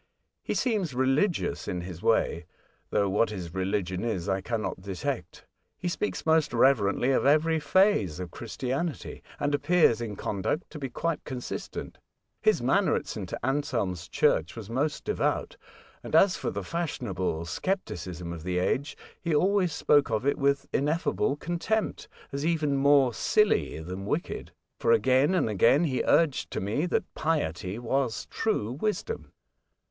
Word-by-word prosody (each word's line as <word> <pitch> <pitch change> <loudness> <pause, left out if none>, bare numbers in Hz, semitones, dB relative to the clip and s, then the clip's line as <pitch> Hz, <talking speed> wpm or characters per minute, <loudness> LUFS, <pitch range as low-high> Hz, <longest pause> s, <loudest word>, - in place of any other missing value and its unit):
He - - -3
seems 205 - 0
religious 135 +8 +1
in 90 - -2
his 85 -1 -8
way; 85 -6 +1 0.4
though 100 - +2
what 105 +4 +2
his 90 -6 -6
religion 95 -1 -1
is 105 -6 -2
I 95 -1 0
cannot 110 -2 -3
detect. 95 -2 -4 0.3
He 180 - -4
speaks 185 +4 -2
most 160 -4 +3
reverently 120 -1 +3
of 130 - +2
every 160 +2 +4
phase 150 - +3
of 90 -1 -6
Christianity, 130 +7 -4 0.2
and 145 0 0
appears 145 -6 +3
in 110 -3 -4
conduct 105 - -2
to 155 - -7
be 135 -2 -4
quite 165 +5 -2
consistent. 125 -3 -6 0.4
His - - +3
manner - - +3
at - - -2
St, - - -6
Anselm's 120 - -1
church 80 +3 +1
was 115 -2 -8
most 145 +5 -1
devout, - - -1 0.5
and - - -3
as 185 +3 +6
for - - -3
the - - -4
fashionable 100 - -2
scepticism 90 - -3
of 85 - -7
the 90 +2 -2
age 130 +10 0 0.2
he 170 -3 0
always 185 +2 +3
spoke 145 0 +3
of 110 +2 -1
it 140 - +1
with 140 0 +1
ineffable 150 -1 +1
contempt, 175 +8 -2 0.2
as 140 +1 -3
even 155 -3 +1
more 135 -2 +4
silly 210 - +2
than 90 +4 -6
wicked; 155 - -3 0.3
for, - - +2
again 145 - +3
and 180 - +2
again, 115 - +4
he 135 -6 0
urged 160 -5 +3
to - - -3
me 110 - -1
that - - +1
piety 100 - -1
was 120 0 -1
true 165 - 0
wisdom." 215 - -3
135 Hz, 150 wpm, -28 LUFS, 100-160 Hz, 0.5 s, as